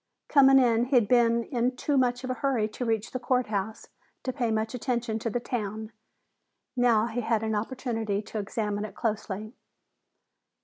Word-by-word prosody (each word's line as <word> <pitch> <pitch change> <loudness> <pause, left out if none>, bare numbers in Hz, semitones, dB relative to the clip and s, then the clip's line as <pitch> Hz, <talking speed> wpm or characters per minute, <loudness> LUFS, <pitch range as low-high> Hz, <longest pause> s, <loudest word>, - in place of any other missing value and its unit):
Coming 270 -2 +7
in, 240 -2 +4
he'd 250 -5 +3
been 235 -1 +3
in 250 0 -1
too 285 +3 -1
much 250 -1 +1
of 255 - -2
a 255 - -5
hurry 260 -6 +1
to 245 +3 -5
reach 225 -2 -1
the 255 - -3
court 250 0 +1
house 210 +1 -3 0.4
to 255 - -2
pay 245 -4 -1
much 220 +1 -1
attention 240 -3 -2
to 230 - -2
the 245 - -1
town. 220 -2 -4 0.8
Now 235 -3 +3
he 240 +1 -3
had 225 -1 0
an 220 0 -1
opportunity 225 -2 -2
to 215 - -5
examine 210 0 -2
it 210 -2 -7
closely. 215 -1 -3
230 Hz, 175 wpm, -27 LUFS, 215-250 Hz, 0.8 s, Coming